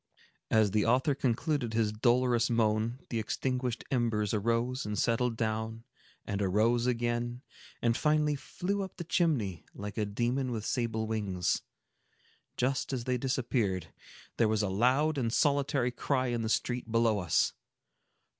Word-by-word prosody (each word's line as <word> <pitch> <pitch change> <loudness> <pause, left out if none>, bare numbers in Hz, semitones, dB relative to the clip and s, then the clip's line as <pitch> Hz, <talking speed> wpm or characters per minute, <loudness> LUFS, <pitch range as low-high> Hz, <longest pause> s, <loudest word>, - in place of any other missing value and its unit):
As 110 -2 +4
the 105 0 +2
author 130 +5 +3
concluded 130 -1 -1
his 110 -2 +2
dolorous 120 +1 +2
moan, 115 +2 +1
the 115 - 0
extinguished 125 +2 -2
embers 115 -5 +1
arose 115 +4 0
and 105 0 -3
settled 115 0 +1
down 110 0 -2 0.4
and 100 0 -2
arose 110 +5 +2
again, 120 +1 -1 0.4
and 115 -1 +3
finally 150 0 +2
flew 195 +8 -3
up 190 -2 -6
the - - -4
chimney, 140 - 0
like 105 +2 -5
a 105 - +1
demon 120 +5 -1
with 110 -3 -3
sable 115 -2 -1
wings. 100 -6 -1 1.0
Just 130 +2 0
as 125 -3 -2
they 125 0 -1
disappeared, 115 - -1 0.4
there 115 - +4
was 110 -1 +1
a 100 - 0
loud 130 +9 +2
and 115 -3 0
solitary 140 -2 +2
cry 130 0 0
in 120 -1 -1
the 110 - -2
street 120 0 -1
below 115 -2 +3
us. 90 -4 +2
120 Hz, 145 wpm, -31 LUFS, 110-130 Hz, 1.0 s, As